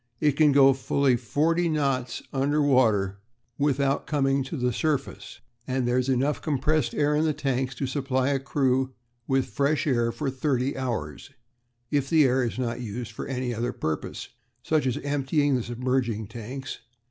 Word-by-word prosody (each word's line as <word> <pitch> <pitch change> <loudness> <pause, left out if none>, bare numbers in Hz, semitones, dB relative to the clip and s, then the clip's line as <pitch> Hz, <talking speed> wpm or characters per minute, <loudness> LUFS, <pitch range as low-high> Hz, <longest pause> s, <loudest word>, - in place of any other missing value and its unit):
It 150 - +3
can 150 +1 +4
go 135 -1 +6
fully 135 0 +1
forty 160 +9 +1
knots 135 -5 -1
under 140 +2 +1
water 110 -9 +3 0.4
without 140 -1 +1
coming 135 -2 +1
to 150 - -5
the 125 -1 0
surface, 145 0 -3 0.3
and 130 -1 0
there 125 +1 +2
is 130 +1 -1
enough 135 +3 +1
compressed 150 -3 0
air 150 0 +2
in 150 - +2
the 155 -2 +1
tanks 130 -3 -1
to 135 - -2
supply 130 0 0
a 140 -1 +1
crew 130 -1 0 0.3
with 135 -1 +2
fresh 140 +8 0
air 120 -5 +1
for 140 +2 -3
thirty 130 0 -1
hours, 115 - -4 0.6
if 140 -2 0
the 160 -2 +5
air 130 -1 +3
is 120 - -3
not 125 -1 -2
used 115 +1 -5
for 115 - -6
any 125 -2 -2
other 120 +2 -2
purpose, 80 -1 -4 0.3
such 155 -4 +1
as 130 +1 0
emptying 145 0 +1
the 125 - 0
submerging 120 -2 -1
tanks. 120 +5 -7
135 Hz, 170 wpm, -26 LUFS, 125-145 Hz, 0.6 s, go